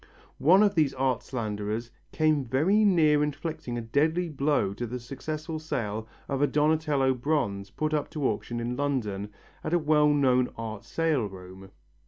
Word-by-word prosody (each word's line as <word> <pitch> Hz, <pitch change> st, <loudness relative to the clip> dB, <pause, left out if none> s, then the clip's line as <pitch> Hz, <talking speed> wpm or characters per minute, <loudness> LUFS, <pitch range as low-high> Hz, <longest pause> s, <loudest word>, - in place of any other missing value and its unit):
One 185 Hz, +8 st, +6 dB
of 205 Hz, -1 st, +3 dB
these 150 Hz, -6 st, +2 dB
art 130 Hz, -2 st, 0 dB
slanderers 110 Hz, -1 st, -4 dB, 0.2 s
came 155 Hz, -3 st, +2 dB
very 155 Hz, -, +2 dB
near 160 Hz, -7 st, +4 dB
inflicting 150 Hz, -4 st, -3 dB
a -, -, -2 dB
deadly 160 Hz, +9 st, +1 dB
blow 140 Hz, -9 st, +1 dB
to 120 Hz, +4 st, -4 dB
the 125 Hz, +2 st, -5 dB
successful 155 Hz, +6 st, -5 dB
sale 110 Hz, -8 st, -3 dB, 0.2 s
of 135 Hz, -1 st, -2 dB
a 145 Hz, -, +4 dB
Donatello 150 Hz, -3 st, +2 dB
bronze 120 Hz, -8 st, -1 dB
put 155 Hz, +10 st, -2 dB
up 150 Hz, -1 st, 0 dB
to 145 Hz, -4 st, -1 dB
auction 120 Hz, +2 st, -3 dB
in 120 Hz, +1 st, -2 dB
London 115 Hz, -8 st, -2 dB, 0.3 s
at 170 Hz, -, 0 dB
a -, -, +5 dB
well 150 Hz, -2 st, +3 dB
known 130 Hz, -4 st, +3 dB
art 110 Hz, -2 st, -6 dB
sale 155 Hz, -9 st, 0 dB
room. 95 Hz, 0 st, -11 dB
135 Hz, 165 wpm, -27 LUFS, 115-155 Hz, 0.3 s, One